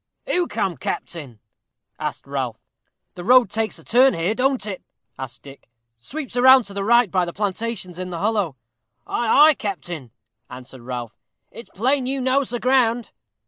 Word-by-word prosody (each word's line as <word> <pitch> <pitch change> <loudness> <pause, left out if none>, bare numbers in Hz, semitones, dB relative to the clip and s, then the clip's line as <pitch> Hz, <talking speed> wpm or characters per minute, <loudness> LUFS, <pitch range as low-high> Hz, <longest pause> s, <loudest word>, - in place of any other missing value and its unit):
"Who 355 -1 +1
come, 185 -5 -2
captain?" 135 -5 -5 0.6
asked - - -4
Ralph. - - -3 0.6
"The 175 - -8
road 245 0 +5
takes 220 0 -1
a - - -12
turn 255 +3 +4
here, 170 +5 0
don't 260 -1 0
it?" 195 -3 -5 0.4
asked 130 -2 -7
Dick 140 -3 -14 0.3
"sweeps 265 - -7
round 260 0 +7
to 200 - -8
the 200 0 -3
right 235 -1 +4
by 185 -1 +2
the 170 - -3
plantations 200 -2 -3
in 185 0 -4
the 175 - -5
hollow?" 205 -6 0 0.5
"Ay, 275 +6 +5
ay, - - +5
captain," 175 - -5 0.4
answered 125 0 -11
Ralph; 120 -2 -6 0.4
"it's 235 - -11
plain 255 +5 0
you 270 +1 -1
knows 260 +1 +1
the 240 - -3
ground." 245 -2 +2
215 Hz, 165 wpm, -22 LUFS, 175-255 Hz, 0.6 s, round